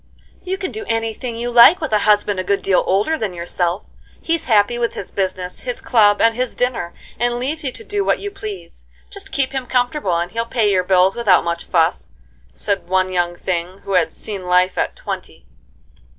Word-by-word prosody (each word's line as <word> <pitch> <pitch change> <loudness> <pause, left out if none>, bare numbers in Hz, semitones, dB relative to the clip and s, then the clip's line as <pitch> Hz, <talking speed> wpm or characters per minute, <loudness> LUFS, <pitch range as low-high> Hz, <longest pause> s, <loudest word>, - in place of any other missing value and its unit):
"You 375 +1 -3
can 380 -2 -4
do 435 - -6
any 225 0 -1
thing 240 +1 -6
you 240 +1 -3
like 240 +9 +8
with 310 -6 -4
a 210 - +4
husband 205 -2 +3
a - - -1
good 200 +2 0
deal 195 -2 +3
older 210 +12 +1
than 200 -5 -3
yourself. 175 +1 -2 0.4
He's 330 -1 -1
happy 220 +1 +3
with 235 -1 -1
his 190 - -7
business, 185 -2 -3
his 245 -1 -4
club, 205 -4 +3
and 230 - +4
his 250 +1 -3
dinner, 245 -9 -2 0.2
and 240 +1 +1
leaves 290 +6 -2
you 265 - -1
to 450 - -7
do 410 -2 -2
what - - +2
you 405 - -6
please; 185 - -9 0.2
just - - -8
keep 265 -1 0
him 265 -2 -4
comfortable 245 - 0
and 175 +1 -2
he'll 230 0 -1
pay 220 -4 +1
your 185 -2 +2
bills 185 +1 +3
without 215 -6 +3
much 170 0 -3
fuss," 160 - +1 0.4
said 195 - -3
one 185 0 +1
young 175 -1 0
thing 180 +1 -4
who 195 - -4
had 180 - +2
seen 195 -4 -6
life 180 +1 +3
at - - -1
twenty. - - -7
205 Hz, 210 wpm, -19 LUFS, 180-245 Hz, 0.4 s, like